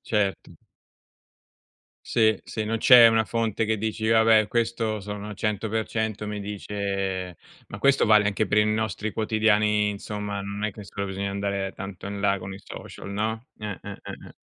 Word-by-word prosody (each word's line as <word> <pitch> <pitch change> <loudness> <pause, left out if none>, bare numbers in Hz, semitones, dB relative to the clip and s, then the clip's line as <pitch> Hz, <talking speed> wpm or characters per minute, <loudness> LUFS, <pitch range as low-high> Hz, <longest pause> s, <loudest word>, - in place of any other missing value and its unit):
certo. 105 -3 -1 1.6
Sì, 110 -3 +3
sì, 110 - -4
non 115 +1 -1
c'è 120 -1 +9
una 110 0 +3
fonte 115 -1 -1
che 110 0 0
dici: 110 +1 -2
"Vabbè 110 -1 +5
questo 115 -1 -1
sono 105 +1 -6
100% 110 0 -2
mi 105 - -4
dice" 100 -3 -3 0.3
ma 100 - -8
questo 140 -1 +4
vale 105 -1 +5
anche 100 +1 0
per 105 - +2
i 105 - +5
nostri 110 0 -1
quotidiani 105 -1 +2
insomma, 105 0 -5
non 100 +1 -5
è 105 - 0
che 105 0 -11
solo 100 +1 -5
bisogna 100 +1 -3
andare 100 -1 -2
tanto 95 0 -7
in 100 0 -5
là 100 -1 +2
con 95 +1 -7
i 100 - -11
social, 100 - -9
no? 110 +4 -2
Eh, 105 -2 -5
eh, - - -7
eh, - - -8 0.3
eh. - - -16
105 Hz, 170 wpm, -25 LUFS, 100-110 Hz, 1.6 s, c'è